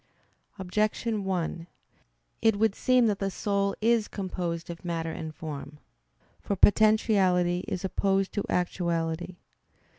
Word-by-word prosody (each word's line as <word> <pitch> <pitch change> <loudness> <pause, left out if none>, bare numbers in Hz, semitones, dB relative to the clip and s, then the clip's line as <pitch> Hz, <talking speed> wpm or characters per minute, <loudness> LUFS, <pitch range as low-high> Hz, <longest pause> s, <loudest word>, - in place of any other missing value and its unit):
Objection 210 +2 -1
1: 175 -2 -2 0.7
It 225 -2 +4
would 215 0 +2
seem 255 +2 +3
that 210 -3 +1
the 195 - -1
soul 200 +1 -1
is 230 -1 +3
composed 175 -3 -4
of 170 - -10
matter 165 -2 -2
and 160 -1 -6
form. 150 -2 -7 0.6
For 200 - -2
potentiality 190 -4 +3
is 185 - -3
opposed 195 0 0
to 205 - -1
actuality. 170 -1 -1
190 Hz, 120 wpm, -28 LUFS, 170-210 Hz, 0.7 s, It